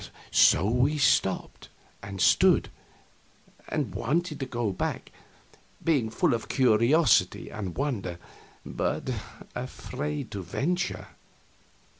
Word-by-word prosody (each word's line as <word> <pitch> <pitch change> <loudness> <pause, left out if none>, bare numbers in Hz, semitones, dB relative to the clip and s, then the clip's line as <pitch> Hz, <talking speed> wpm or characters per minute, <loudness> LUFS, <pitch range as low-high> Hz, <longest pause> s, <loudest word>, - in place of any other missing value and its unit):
So 100 - +5
we 125 +6 +2
stopped 140 - +1 0.3
and 100 -1 -8
stood, - - +4 1.0
and - - -2
wanted 155 +4 -1
to 135 - -3
go 120 -4 -2
back, 95 - -4 0.7
being 140 -9 +2
full 110 - +1
of 115 - -3
curiosity 130 - +3
and 95 -5 -6
wonder, 115 -11 -2 0.5
but - - -2 0.4
afraid 130 +2 -5
to 100 - -4
venture. 160 - -2
125 Hz, 100 wpm, -27 LUFS, 105-145 Hz, 1.0 s, So